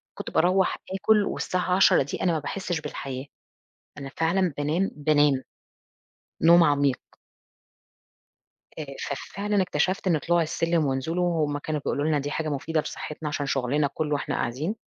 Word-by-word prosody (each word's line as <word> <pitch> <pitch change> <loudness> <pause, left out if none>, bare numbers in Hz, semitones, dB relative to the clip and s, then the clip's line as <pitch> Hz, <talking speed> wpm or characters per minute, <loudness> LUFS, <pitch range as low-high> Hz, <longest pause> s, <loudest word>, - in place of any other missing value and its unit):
كنت - - -6
باروّح 185 +3 +2 0.2
آكل 210 +2 +3
والساعة 180 -1 -1
22:00 190 -6 +5
دي 140 - -5
أنا 180 - +3
ما 160 - 0
باحسش 175 +1 -3
بالحياة. 135 -2 -6 0.7
أنا 140 -1 -6
فعلًا 170 +1 +1
بانام، 160 +7 0
بانام 145 -3 +2 1.0
نوم 170 +1 +7
عميق. 140 -3 +2 1.8
آآ، 155 - -4 0.2
ففعلًا 200 +7 -1
اكتشفت 185 +3 -1
إن 165 -4 +3
طلوع 175 +3 +2
السلم 165 0 0
ونزوله 140 +7 -1
هُم 155 -4 0
كانوا 150 0 -3
بيقولوا 145 - -1
لنا 155 -2 +2
دي 145 +1 -3
حاجة 155 0 -2
مفيدة 150 +2 -1
لصحتنا 150 +1 -6
عشان 145 -1 -2
شغلنا 140 +2 +1
كله 150 -1 -2
وإحنا 145 - -2
قاعدين، 150 - -2
155 Hz, 145 wpm, -26 LUFS, 145-175 Hz, 1.8 s, نوم